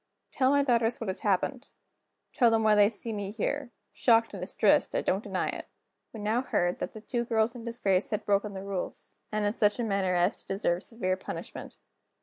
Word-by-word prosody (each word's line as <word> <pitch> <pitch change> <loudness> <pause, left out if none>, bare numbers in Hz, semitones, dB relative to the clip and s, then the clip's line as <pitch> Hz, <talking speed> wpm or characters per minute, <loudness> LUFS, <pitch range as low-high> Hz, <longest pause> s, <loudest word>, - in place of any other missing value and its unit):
"Tell 260 -1 +2
my 285 0 +4
daughters 235 -3 +2
what 225 - -4
has 190 - -4
happened; 215 +7 -1 0.6
tell 240 -3 +5
them 225 -1 +2
why 215 0 +5
they 205 -1 +6
see 230 0 -4
me 200 -2 -4
here 255 +6 -2 0.2
shocked 230 -2 +3
and 195 - -6
distressed, 195 +2 +2
I - - +2
don't 195 +3 0
deny 190 -2 -2
it." - - -6 0.4
We 225 - -9
now 215 +4 +1
heard 175 -8 0
that - - -4
the 220 - -8
two 240 +2 -2
girls 225 -1 +1
in 235 -1 -8
disgrace 200 -5 0
had 210 -1 -3
broken 200 0 +1
the 190 - -6
rules, 195 -2 -5 0.2
and 210 -1 0
in 205 - +1
such 210 -2 +2
a - - +1
manner 195 -4 0
as 180 +5 +1
to - - -25
deserve 185 -2 0
severe 185 -5 -2
punishment. - - -8
210 Hz, 210 wpm, -29 LUFS, 195-230 Hz, 0.6 s, they